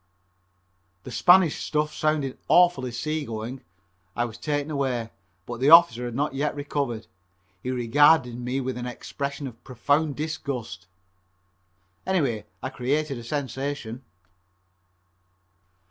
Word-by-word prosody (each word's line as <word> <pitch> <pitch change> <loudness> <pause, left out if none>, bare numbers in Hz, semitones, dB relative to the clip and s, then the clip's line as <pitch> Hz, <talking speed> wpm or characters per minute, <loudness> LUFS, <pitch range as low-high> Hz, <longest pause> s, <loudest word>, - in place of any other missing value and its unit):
That - - -8
Spanish 180 -3 +5
stuff 150 0 -1
sounds 155 -4 0
awfully 175 -8 +4
sea 155 +6 -2
going. 115 +2 -6 0.5
I 120 - +1
was 115 -2 -9
taken 145 0 -2
away, 125 -6 -1 0.3
but 120 -1 -6
the 135 +3 +3
officer 160 -8 +7
had 120 -1 -5
not 145 +2 0
yet 145 +2 -1
recovered. 140 -6 -3 0.6
He 125 - -4
regarded 125 +1 +4
me 125 +2 -2
with 130 -1 -3
an 125 - -4
expression 140 +3 -5
of 120 -4 -9
profound 145 +4 0
disgust. 135 - -5 1.2
Anyway 130 - 0 0.2
I 130 - -2
created 140 +2 -1
a - - -9
sensation. 135 -2 -4
135 Hz, 120 wpm, -25 LUFS, 120-150 Hz, 1.2 s, officer